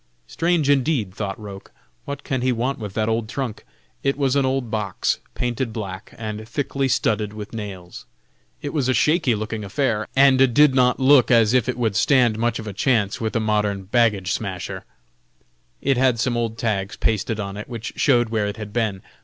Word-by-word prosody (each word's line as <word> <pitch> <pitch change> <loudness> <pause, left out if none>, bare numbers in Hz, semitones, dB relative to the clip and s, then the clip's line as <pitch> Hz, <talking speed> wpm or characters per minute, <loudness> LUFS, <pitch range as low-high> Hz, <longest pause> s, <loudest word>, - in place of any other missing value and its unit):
Strange 170 -3 0
indeed, 135 -8 +1
thought 100 -1 -4
Roch, 100 -2 -10 0.3
what 140 0 -6
can 130 -4 -2
he 130 +1 +2
want 125 +3 -1
with 105 -3 -7
that 110 -1 0
old 115 -1 -1
trunk? 125 -5 -4 0.4
It 140 0 0
was 135 -2 +1
an 140 -2 +2
old 130 -3 -1
box, 105 -4 -1 0.2
painted 120 0 -2
black, 95 -4 -7
and 110 0 -6
thickly 135 +1 -1
studded 105 -4 0
with 105 0 -8
nails. 90 - -8 0.6
It 145 - -4
was 140 -5 0
a 130 - +3
shaky 150 -6 +3
looking 110 0 -4
affair, 110 +1 -1
and 135 -1 +5 0.2
did 145 -2 +6
not 125 -1 +3
look 135 -1 +5
as 115 -2 +4
if 125 -1 +2
it 125 - -2
would 110 -5 0
stand 120 -1 +3
much 115 0 0
of 110 - -7
a 105 - -5
chance 105 -1 +1
with 110 -1 -2
a - - +3
modern 105 -2 0
"baggage 105 -3 +1
smasher." 95 -5 -4 1.0
It 135 -2 +1
had 125 -2 +3
some 120 +1 0
old 115 -1 -2
tags 100 -4 -2
pasted 110 0 0
on 100 -1 -4
it, 105 +3 -7
which 115 -2 -6
showed 120 -4 +3
where 110 -2 0
it 105 - -5
had 105 -2 -7
been. 105 -5 -1
115 Hz, 195 wpm, -22 LUFS, 105-130 Hz, 1.0 s, did